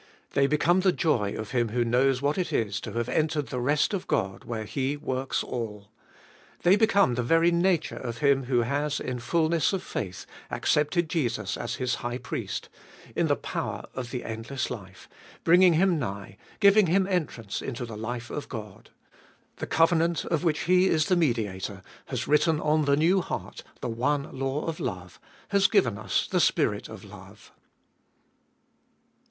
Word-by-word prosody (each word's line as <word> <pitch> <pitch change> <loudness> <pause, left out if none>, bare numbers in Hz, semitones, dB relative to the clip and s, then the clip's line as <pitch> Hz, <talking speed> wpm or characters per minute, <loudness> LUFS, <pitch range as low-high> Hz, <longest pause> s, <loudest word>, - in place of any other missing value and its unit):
They 140 0 +3
become 165 +5 +3
the 185 0 +4
joy 115 - 0
of 110 -1 -6
him 120 -3 +1
who 120 +2 0
knows 125 +3 +2
what 145 +6 +1
it 180 - -1
is 100 -3 -1
to - - -7
have 120 0 -1
entered 155 +1 0
the 125 - -3
rest 145 +9 +1
of 195 - -3
God, 95 0 -1
where 115 -2 -4
He 135 +5 -2
works 130 -2 -2
all. 105 -4 -5 0.7
They 180 +2 +6
become 200 - +3
the 125 - -1
very 165 +7 +3
nature 170 -1 +1
of 120 -2 -5
Him 135 0 +2
who 125 -1 +2
has, 145 +3 -1
in 125 -1 -4
fulness 165 +7 +1
of 190 -1 -2
faith, 90 -4 -5 0.2
accepted 160 +3 +1
Jesus 120 - -1
as - - -4
His 125 -1 -1
High 120 0 -3
Priest, - - -5 0.5
in - - +2
the - - +3
power - - -4
of 125 -2 -5
the 125 -1 -4
endless 115 +4 -4
life, 95 -6 -9 0.4
bringing 175 +1 +6
him 175 0 +3
nigh, 100 -6 -5 0.2
giving 200 -1 +6
him 190 +3 +3
entrance 155 - -2
into 125 -2 -4
the 115 -2 -8
life 115 +2 -5
of 150 - -5
God. 105 -5 -8 0.7
The - - -5
covenant, 165 0 +2
of 165 -1 -1
which 160 -3 +1
He 185 +1 +4
is 155 -4 +2
the 185 - +4
Mediator, 105 - -1 0.2
has - - -3
written 150 +1 +3
on 155 0 +2
the 140 0 +3
new 175 +5 +3
heart - - -6 0.2
the - - -2
one 140 +6 -1
law 135 +2 -2
of 165 -1 -4
love, 90 -1 -5 0.3
has 200 0 +4
given 120 - +2
us 105 -4 0
the - - +1
spirit - - +1
of - - -10
love. - - -14
140 Hz, 175 wpm, -27 LUFS, 115-165 Hz, 0.7 s, They